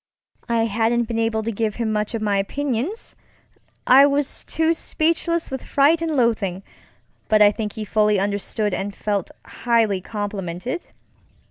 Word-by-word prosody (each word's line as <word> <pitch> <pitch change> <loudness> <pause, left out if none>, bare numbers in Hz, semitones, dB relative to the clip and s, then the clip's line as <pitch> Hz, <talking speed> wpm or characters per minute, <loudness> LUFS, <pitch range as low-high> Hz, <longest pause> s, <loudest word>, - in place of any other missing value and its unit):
I 230 -1 +2
hadn't 230 +2 +1
been 230 0 -3
able 225 -1 0
to 230 - -2
give 215 -1 -2
him 230 -2 -2
much 210 +2 -1
of 220 - -3
my 200 -2 +2
opinionsŌĆöI 275 - 0
was 285 0 -1
too 320 +1 +1
speechless 335 0 -1
with 265 - -4
fright 295 +4 +3
and 325 -1 -1
loathingŌĆöbut 220 -8 0 0.7
I 210 -1 +6
think 210 -1 -4
he 215 - -5
fully 210 -1 +2
understood 205 +1 -1
and 200 +2 -3
felt 205 -3 -2 0.2
highly 225 -5 +1
complimented. 205 - -5
225 Hz, 140 wpm, -22 LUFS, 205-265 Hz, 0.7 s, I